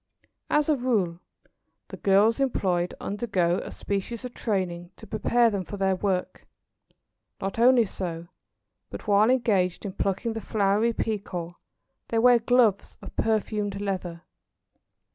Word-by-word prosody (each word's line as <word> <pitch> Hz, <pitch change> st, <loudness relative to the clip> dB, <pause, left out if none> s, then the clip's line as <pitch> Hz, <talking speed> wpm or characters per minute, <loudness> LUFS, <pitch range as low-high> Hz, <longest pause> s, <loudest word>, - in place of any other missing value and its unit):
As 300 Hz, -1 st, +2 dB
a 305 Hz, -, +3 dB
rule, 215 Hz, -10 st, 0 dB, 0.7 s
the -, -, -8 dB
girls 205 Hz, +4 st, +3 dB
employed 185 Hz, -10 st, 0 dB
undergo 195 Hz, -4 st, 0 dB
a -, -, -7 dB
species 205 Hz, +4 st, -4 dB
of 250 Hz, -, -7 dB
training 180 Hz, -5 st, -2 dB
to -, -, -12 dB
prepare 235 Hz, +2 st, +2 dB
them 200 Hz, -2 st, -2 dB
for 205 Hz, -, -7 dB
their 190 Hz, -1 st, +1 dB
work. 185 Hz, -1 st, -2 dB, 0.9 s
Not 195 Hz, +3 st, -4 dB
only 245 Hz, -1 st, +6 dB
so, 170 Hz, -4 st, -5 dB, 0.6 s
but -, -, -9 dB
while 210 Hz, +2 st, +4 dB
engaged 210 Hz, -8 st, +1 dB
in 195 Hz, -, -4 dB
plucking 200 Hz, +4 st, -1 dB
the 225 Hz, -, -5 dB
flowery 210 Hz, +2 st, +1 dB
Pekoe 190 Hz, -6 st, -4 dB, 0.5 s
they 230 Hz, -, -1 dB
wear 245 Hz, +1 st, +6 dB
gloves 230 Hz, -4 st, +2 dB
of -, -, -10 dB
perfumed 210 Hz, -2 st, -1 dB
leather. 185 Hz, -4 st, -4 dB
205 Hz, 135 wpm, -26 LUFS, 185-230 Hz, 0.9 s, only